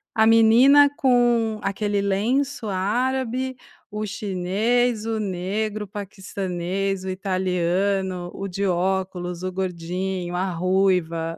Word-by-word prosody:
a 220 -1 +4
menina 240 +6 +6
com 240 -4 +2
aquele 205 0 -1
lenço 230 +6 0
árabe, 250 +6 -1 0.4
o 215 +1 -3
chinês, 210 +4 0
o 225 -1 -1
negro, 205 +2 -2
o - - -17
paquistanês, 195 -1 -4
o - - -3
italiano, 185 0 -1
o 195 - -6
de 195 +2 -3
óculos, 180 -1 -1
o 185 - -2
gordinho, 180 0 -3
a 185 +1 -1
ruiva, 175 -2 0
195 Hz, 110 wpm, -23 LUFS, 185-220 Hz, 0.4 s, menina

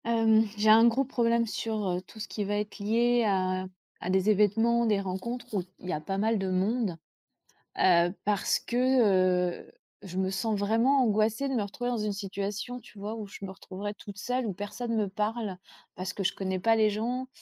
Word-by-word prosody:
Hem, 225 -1 +4
j'ai 215 +1 +3
un 225 +2 +8
gros 245 +4 +2
problème 235 -2 +1
sur, 220 -2 -3
heu, 180 0 -1
tout 220 - -15
ce - - -5
qui 210 - -3
va 205 +1 -1
être 210 +1 -4
lié 235 +3 +2
à 185 -1 0 0.4
à 180 - -3
des 190 +3 +3
événements, 225 +3 +3
des 210 -2 +2
rencontres 200 +6 -4
où 200 - +1 0.2
il - - -11
y - - 0
a 150 - -3
pas 195 +5 -3
mal 220 +1 +1
de 190 -1 -2
monde, 190 0 0 0.8
heu, 175 -1 +4
parce 205 -1 +2
que, 195 -8 +2
heu, - - -19 0.3
je 185 -1 -8
me 190 0 0
sens 210 +3 -1
vraiment 230 +7 +3
angoissée 220 +3 +1
de 270 - -2
me 240 - +1
retrouver 245 +5 -3
dans 240 - -1
une 210 0 -1
situation, 200 +4 -4
tu 230 -3 -17
vois, 205 +2 -5
où 215 -2 -6
je 200 0 -9
me 190 - -6
retrouverai 195 +2 -6
toute 205 -1 -11
seule, 250 +3 -2
où 200 - -2
personne 220 +5 -4
me 215 -2 +1
parle. 210 0 -2 0.4
Parce 185 +1 -5
que 200 - -3
je 185 - +1
connais 190 -1 -2
pas 225 +5 +3
les 215 -1 +4
gens 240 +5 -2
210 Hz, 210 wpm, -28 LUFS, 190-230 Hz, 0.8 s, un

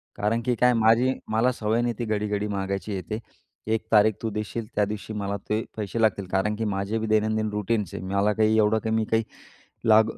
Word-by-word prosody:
कारण 110 +3 0
की 125 -1 +2
काय 125 +1 +4
माझी 115 +3 +4 0.2
मला 115 +3 +3
सवय 110 +1 0
नाही, 120 0 0
ती 120 - -1
घडी-घडी 105 -1 -1
मागायची 100 0 -3
हे 95 - -2
ते 110 - -1 0.5
एक 110 0 -1
तारीख 110 0 +5
तू 115 - -1
देशील 105 +2 -4
त्या 105 0 +3
दिवशी 105 +1 -6
मला 100 -1 -2
ते 110 +1 +1
पैसे 105 +2 -2
लागतील, 100 -4 +1
कारण 105 +3 +1
की 115 - -2
माझे 100 +3 -1
बी 110 - -3
दैनंदिन 110 0 +1
रुटीनचे 105 -2 -1
आहे 95 - -6
मला 100 +2 +2
काही 110 0 +3
एवढं 110 +1 +3
काही 110 0 -1
मी 110 -1 +1
काही 110 +1 +1 0.7
लागू 110 +1 +6
110 Hz, 210 wpm, -25 LUFS, 105-110 Hz, 0.7 s, लागू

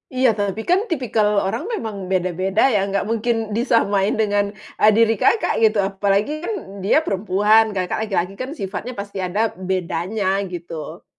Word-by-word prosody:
Iya, 255 0 +4
tapi 205 0 -2
kan 360 +2 +5
tipikal 240 - +1 0.2
orang 225 +9 -2
memang 220 - -4 0.2
beda-beda 185 +2 0
ya, 205 - +3
nggak 200 0 -1
mungkin 230 +1 0 0.2
disamain 210 -5 +2
dengan, 205 -2 +2 0.4
eee, 215 - +7
diri 225 0 +5
Kakak, 450 - +3
gitu. 220 -1 +4
Apalagi 200 +5 0
kan 400 +6 -3 0.3
dia 200 - +3
perempuan, 205 +3 +3
Kakak 185 -1 -1
laki-laki 190 -1 -1
kan 255 - -4
sifatnya 205 +6 -5
pasti 200 0 -6
ada 205 +5 0 0.2
bedanya 190 +2 -1
gitu. 170 -3 -7
205 Hz, 150 wpm, -21 LUFS, 190-225 Hz, 0.4 s, eee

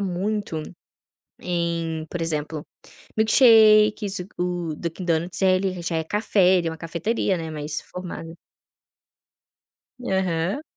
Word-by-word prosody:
muito 195 -2 -2 0.8
em, 170 -2 -2
por 175 - -4
exemplo, 155 -1 -3 0.5
milkshake, 220 -2 +6
isso 190 -2 -3
o 175 -2 -2
Dunkin 170 +3 -5
Donuts, 175 +3 -1
ele 185 -1 +2
já 170 -1 -2
é 160 - -1
café, 190 0 +3
ele 170 -2 0
é - - -2
uma 160 - -8
cafeteria, 175 +5 -1
né, 165 -2 -5
mais 150 -1 -4
formada. 180 -2 -8 1.7
Aham. 190 - -1
180 Hz, 115 wpm, -23 LUFS, 165-195 Hz, 1.7 s, milkshake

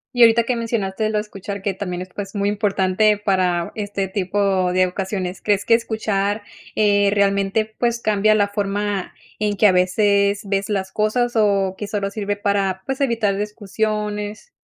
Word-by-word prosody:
Y 245 - +2
ahorita 230 0 +7
que 245 +2 -1
mencionaste 220 -2 -1
lo 215 - 0
de 210 - +1
escuchar, 200 -1 -7
que 200 -1 0
también 180 -2 -4
es, 185 - -13
pues, 200 0 -6
muy 200 0 0
importante 205 0 +2
para 185 -4 0
este 205 -2 -3
tipo 190 -1 0
de 185 0 +3
ocasiones, 190 0 -4
¿crees 205 -1 +1
que 230 - +4
escuchar, 215 -2 0 0.3
eh, 205 -1 +3
realmente, 200 +1 +2
pues 235 -1 +1
cambia 215 -1 +3
la 205 -1 +3
forma 200 -1 -2 0.2
en 210 -1 0
que 215 - +3
a 205 - +7
veces 200 +2 +2
ves 195 0 -1
las 195 -2 -2
cosas 240 +3 0
o 200 -3 +2
que 210 - -4
solo 200 -2 -2
sirve 205 -1 -2
para, 200 -2 -1
pues 270 +1 -3
evitar 230 -7 +1
discusiones? 210 - -3
205 Hz, 170 wpm, -21 LUFS, 195-215 Hz, 0.3 s, ahorita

